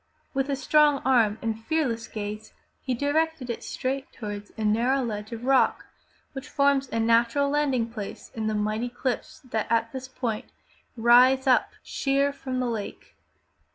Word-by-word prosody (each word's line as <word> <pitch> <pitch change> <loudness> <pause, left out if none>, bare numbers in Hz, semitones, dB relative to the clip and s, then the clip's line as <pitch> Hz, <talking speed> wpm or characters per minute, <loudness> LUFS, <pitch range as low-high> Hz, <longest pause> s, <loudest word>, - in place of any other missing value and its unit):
With 270 0 -1
a 280 - +1
strong 295 +1 +4
arm 230 -5 +3
and 225 0 -3
fearless 255 -7 -1
gaze 215 0 -6 0.3
he 255 -2 -2
directed 290 0 0
it 235 - -6
straight 270 +1 -3
toward 205 -2 -6
a 220 - -3
narrow 245 +6 +2
ledge 210 -2 -4
of 230 +1 -6
rock 270 0 +3 0.5
which 270 0 -7
forms 280 -1 +2
a 230 - -1
natural 235 +5 +3
landing 275 -6 +1
place 215 -4 -8
in 220 -1 -3
the 215 - 0
mighty 215 +3 -1
cliffs 245 +1 -4
that 225 -5 -3
at 230 0 +2
this 260 -1 -6
point 245 -3 -3 0.5
rise 250 +3 +6
up 260 -2 +3
sheer 275 +1 0
from 260 -2 -4
the 255 - 0
lake. 225 -4 -5
245 Hz, 160 wpm, -26 LUFS, 225-275 Hz, 0.5 s, rise